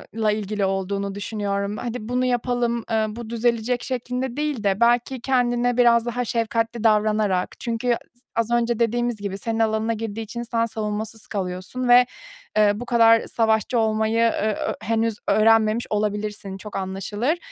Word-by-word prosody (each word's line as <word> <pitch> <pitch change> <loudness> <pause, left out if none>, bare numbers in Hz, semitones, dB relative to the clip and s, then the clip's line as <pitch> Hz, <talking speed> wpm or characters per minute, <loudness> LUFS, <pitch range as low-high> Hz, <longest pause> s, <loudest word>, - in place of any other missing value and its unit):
la 220 -2 +2
ilgili 210 -1 -1
olduğunu 195 +1 -2
düşünüyorum, 200 0 -2
"Hadi 240 -2 -5
bunu 250 +1 +1
yapalım, 245 -1 0
eee, 220 -1 +2
bu 225 +1 -7
düzelecek," 235 +1 0
şeklinde 250 0 -3
değil 295 -7 -2
de, 200 0 +1
belki 240 +2 +2
kendine 245 -1 +1
biraz 235 -1 +5
daha 245 +1 -2
şefkatli 230 0 -1
davranarak, 210 -4 +2
çünkü 235 -1 -3 0.3
s 245 +1 -29
az 230 0 0
önce 235 -1 +1
dediğimiz 240 +1 +1
gibi, 200 -1 -4
senin 225 +2 -3
alanına 220 0 +1
girdiği 225 0 -4
için 235 +2 -5
sen 230 -1 0
savunmasız 215 0 -4
kalıyorsun 190 +6 -3
ve, 245 +1 +8 0.5
eee, 210 -1 +5
bu 245 +4 -6
kadar 230 -1 +5
savaşçı 225 +1 +1
olmayı 220 0 +1
e 230 0 +4 0.2
ö - - -2
henüz 225 0 0
öğrenmemiş 220 +1 +3
olabilirsin, 210 -2 -2
çok 210 +1 -9
anlaşılır. 195 - -2
225 Hz, 155 wpm, -23 LUFS, 210-240 Hz, 0.5 s, ve